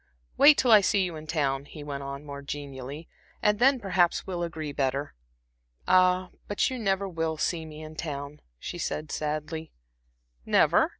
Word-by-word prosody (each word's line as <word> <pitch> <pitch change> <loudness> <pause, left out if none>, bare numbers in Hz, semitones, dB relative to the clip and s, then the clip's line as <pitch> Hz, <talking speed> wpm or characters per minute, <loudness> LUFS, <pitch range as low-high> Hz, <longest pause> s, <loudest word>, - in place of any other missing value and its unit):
Wait 290 +1 +8
till 250 - +3
I 215 -2 +9
see 195 0 +2
you 175 -3 -3
in 155 0 -9
town," 140 -3 0
he 150 +1 -10
went 140 -1 -5
on, 140 +1 -6
more 140 -1 -7
genially 140 +1 -7 0.3
"and 210 0 +2
then 265 +1 +5
perhaps 180 -5 +1
we'll 180 -2 -4
agree 160 -3 -4
better." 140 +1 -1 0.7
"Ah, 185 0 +4 0.2
but 205 +5 +1
you 255 - -4
never 195 -2 0
will 165 -3 -2
see 160 0 -1
me 155 0 -9
in 155 0 -9
town," 145 -2 -5 0.2
she 175 - -6
said, 155 -2 -3
sadly. 155 +1 -3 0.7
"Never?" - - +4
160 Hz, 170 wpm, -27 LUFS, 145-185 Hz, 0.7 s, I